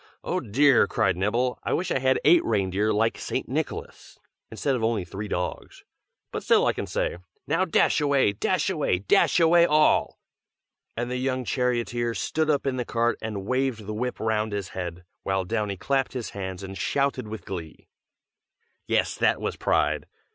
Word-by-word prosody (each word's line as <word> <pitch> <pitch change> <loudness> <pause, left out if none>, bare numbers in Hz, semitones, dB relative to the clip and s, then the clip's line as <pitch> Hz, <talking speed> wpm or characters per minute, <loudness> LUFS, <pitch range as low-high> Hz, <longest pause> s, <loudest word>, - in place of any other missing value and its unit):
Oh, - - -1
dear!" 135 +4 +4
cried 105 -5 +1
Nibble, 115 +7 0
"I - - -1
wish 185 - -1
I - - +1
had 130 0 +2
eight 165 +3 +6
reindeer 100 0 0
like 110 +2 +1
St. - - -3
Nicholas, - - -5 0.3
instead 140 -2 -1
of 120 - -3
only 110 -5 0
three 100 +4 -6
dogs. 90 -2 -4 0.5
But - - -4
still - - +4
I - - +2
can - - -5
say, 85 - -2 0.3
'Now 165 +5 +1
dash 160 -2 +2
away, 140 -7 +3
dash 100 - 0
away, - - +1
dash 100 - +3
away 170 +1 +5
all!'" 150 +1 +3 0.8
and 120 +1 -2
the 125 - -1
young 130 0 -1
charioteer 120 -1 -1
stood 155 0 -1
up 145 -2 +1
in 135 -2 -1
the 125 - -1
cart 120 0 0
and 105 -3 -4
waved 130 -3 -1
the 110 - -4
whip 125 +3 -3
round 110 -1 0
his 100 -3 -3
head, 90 -1 -6 0.2
while 95 -1 -1
Downy 105 -1 -2
clapped 135 +6 0
his 125 -3 -5
hands 95 -1 -6
and 95 0 -7
shouted 140 +1 -1
with 110 +1 -7
glee. 85 -6 -7 1.0
Yes, - - +1
that - - +2
was - - -3
pride! - - 0
115 Hz, 175 wpm, -25 LUFS, 100-130 Hz, 1.0 s, eight